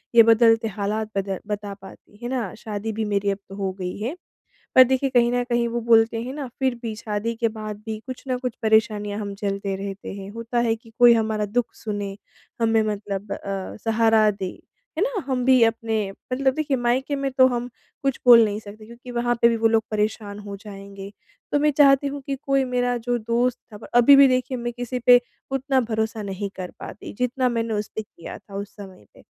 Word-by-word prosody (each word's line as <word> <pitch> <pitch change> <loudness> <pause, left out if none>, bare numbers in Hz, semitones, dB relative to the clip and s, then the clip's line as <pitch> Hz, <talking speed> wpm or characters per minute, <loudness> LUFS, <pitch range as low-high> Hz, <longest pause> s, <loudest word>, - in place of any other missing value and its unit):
ये 230 - +10
बदलते 225 0 +5
हालात 215 +1 -3
बद 195 -1 -2
बता 205 -1 -4
पाती, 195 +1 -15
है 240 - -3
ना। 245 -7 -2
शादी 215 0 -4
भी 220 +1 -2
मेरी 200 -1 0
अब 195 - -3
तो 195 - -9
हो 195 -1 -2
गई 180 -1 -4
है। 235 +10 -3 0.6
पर 260 - +10
देखिए 265 +2 0
कहीं 240 -2 +4
न 245 0 +1
कहीं 240 -1 +1
वो 235 +1 -2
बोलते 225 0 +3
हैं 250 +2 -5
ना 290 -2 -5
फिर 265 -2 +1
भी 225 -2 -3
शादी 215 +1 -3
के 230 - +3
बाद 215 -1 -6
भी 220 -1 -4
कुछ 255 -1 -7
न 255 - +1
कुछ 250 -2 -4
परेशानियाँ 210 -2 +2
हम 200 -1 -5
झेलते 200 -1 -3
रहते 195 0 -6
हैं। 195 0 -8
होता 230 +2 -4
है 230 -1 +2
कि 225 0 -19
कोई 240 -1 +8
हमारा 220 -2 0
दुःख 235 +3 0
सुने, 205 -2 -5 0.4
हमें 225 -1 +3
मतलब 205 -1 -4
अ, 195 -1 -5
सहारा 225 -1 +4
दे। 195 -3 -6 0.4
है - - +2
ना। 460 -2 0
हम 255 -2 -1
भी 255 -1 +5
अपने 225 0 0 0.4
मतलब 265 0 +2
देखिए 290 -2 0
मायके 255 +4 0
में 275 0 -2
तो 260 0 +6
हम 245 -1 -2 0.3
कुछ 275 -2 0
बोल 235 -2 +9
नहीं 210 -1 -2
सकते 215 +1 -12
क्योंकि 235 +2 -12
वहाँ 240 0 0
पे 235 - +8
भी 230 - +1
वो 225 0 +3
लोग 225 0 +3
परेशान 210 -1 -2
हो 205 -1 -7
जाएँगे। 200 -1 -10 0.4
तो 290 - +3
मैं 300 +1 +3
चाहती 275 -1 +6
हूँ 280 0 -4
कि 275 - -2
कोई 275 -1 +2
मेरा 245 -1 0
जो 245 0 +1
दोस्त 235 +2 0
था 210 - -9 0.2
अभी 275 +4 +8
भी 275 0 +8
देखिए 255 0 0
मैं 240 0 -3
किसी 245 +1 -4
पे 245 0 +8 0.3
उतना 270 0 +1
भरोसा 220 -1 -2
नहीं 200 0 -4
कर 185 -1 -5
पाती, - - -8
जितना 250 +1 +1
मैंने 230 -2 -1
उसपे 210 +1 -3
किया 170 -5 -10
था, 200 - -16
उस 200 +1 -6
समय 190 - -11
पे। - - -18
225 Hz, 215 wpm, -23 LUFS, 205-245 Hz, 0.6 s, ये